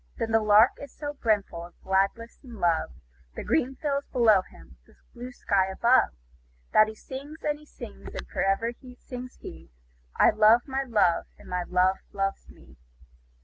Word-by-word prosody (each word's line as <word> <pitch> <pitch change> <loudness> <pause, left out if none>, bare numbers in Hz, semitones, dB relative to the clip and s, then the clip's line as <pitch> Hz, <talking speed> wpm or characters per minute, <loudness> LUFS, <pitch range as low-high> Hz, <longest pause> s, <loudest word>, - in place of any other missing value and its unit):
But - - -2
the 225 - +4
Lark 215 +2 +6
is 280 -2 -9
so 290 -1 -5
brimful 205 -10 -1
of 175 0 -14
gladness 195 +5 -1
and 245 -4 -12
love, 170 -3 +1 0.5
The - - -5
green 265 -4 0
fields 280 0 -2
below 225 -6 +4
him, 65 - -18
the - - -22 0.2
blue 245 +1 -8
sky 195 -6 +1
above, 235 +7 +3 0.6
That 215 - +6
he 220 - -7
sings, 275 +7 -9
and 295 -1 -1
he 300 - -18
sings; 65 - -11
and - - -5
for - - -4
ever 210 +5 0 0.2
sings 250 0 -9
he 80 -2 -11 0.5
'I - - +5
love 215 +2 +5
my 270 0 -1
Love, 195 -8 +2
and - - -16
my 180 0 -2
Love 185 +1 +2 0.2
loves 195 0 -3
me!' 65 +1 -18
215 Hz, 175 wpm, -27 LUFS, 190-255 Hz, 0.6 s, Lark